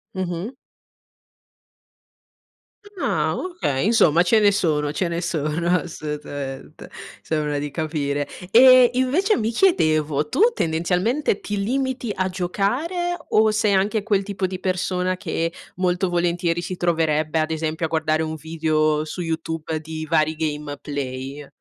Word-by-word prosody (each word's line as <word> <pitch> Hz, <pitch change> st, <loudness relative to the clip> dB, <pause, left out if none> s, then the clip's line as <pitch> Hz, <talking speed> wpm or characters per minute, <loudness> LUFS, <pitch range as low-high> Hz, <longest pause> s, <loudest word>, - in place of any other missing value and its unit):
Mh-mh. 185 Hz, +4 st, -3 dB, 2.5 s
Ah -, -, 0 dB
okay, 345 Hz, -, -2 dB
insomma, 175 Hz, -8 st, +4 dB
ce 220 Hz, +4 st, +4 dB
ne 205 Hz, -1 st, +5 dB
sono, 150 Hz, -6 st, 0 dB
ce 180 Hz, +3 st, -1 dB
ne 170 Hz, 0 st, -2 dB
sono, 160 Hz, 0 st, -2 dB
assolutamente, 145 Hz, -4 st, -7 dB, 0.3 s
sembra 150 Hz, -2 st, -1 dB
di 145 Hz, 0 st, -3 dB
capire. 145 Hz, -2 st, -2 dB, 0.2 s
E, 255 Hz, 0 st, +8 dB
invece, 300 Hz, -, +2 dB
mi 225 Hz, +1 st, -1 dB
chiedevo, 155 Hz, -, +2 dB
tu -, -, 0 dB
tendenzialmente 180 Hz, -, 0 dB
ti 205 Hz, -1 st, -3 dB
limiti 260 Hz, -1 st, -1 dB
a 185 Hz, 0 st, -1 dB
giocare 250 Hz, -, -1 dB
o 215 Hz, 0 st, +4 dB
sei 215 Hz, -1 st, +2 dB
anche 205 Hz, +2 st, +1 dB
quel 200 Hz, -2 st, +1 dB
tipo 195 Hz, -1 st, -3 dB
di 185 Hz, 0 st, -6 dB
persona 185 Hz, 0 st, -1 dB
che 165 Hz, -1 st, -2 dB, 0.2 s
molto 180 Hz, 0 st, 0 dB
volentieri 175 Hz, 0 st, 0 dB
si 180 Hz, +1 st, -5 dB
troverebbe, 160 Hz, -2 st, +1 dB
ad 155 Hz, +1 st, 0 dB
esempio, 160 Hz, +1 st, -2 dB
a -, -, -3 dB
guardare 160 Hz, -1 st, +1 dB
un 160 Hz, 0 st, -3 dB
video 155 Hz, -1 st, 0 dB
su 175 Hz, +3 st, -6 dB
YouTube 160 Hz, -1 st, -3 dB
di 155 Hz, 0 st, -6 dB
vari 155 Hz, -1 st, +2 dB
gameplay? 145 Hz, -2 st, -5 dB
170 Hz, 130 wpm, -22 LUFS, 155-200 Hz, 2.5 s, E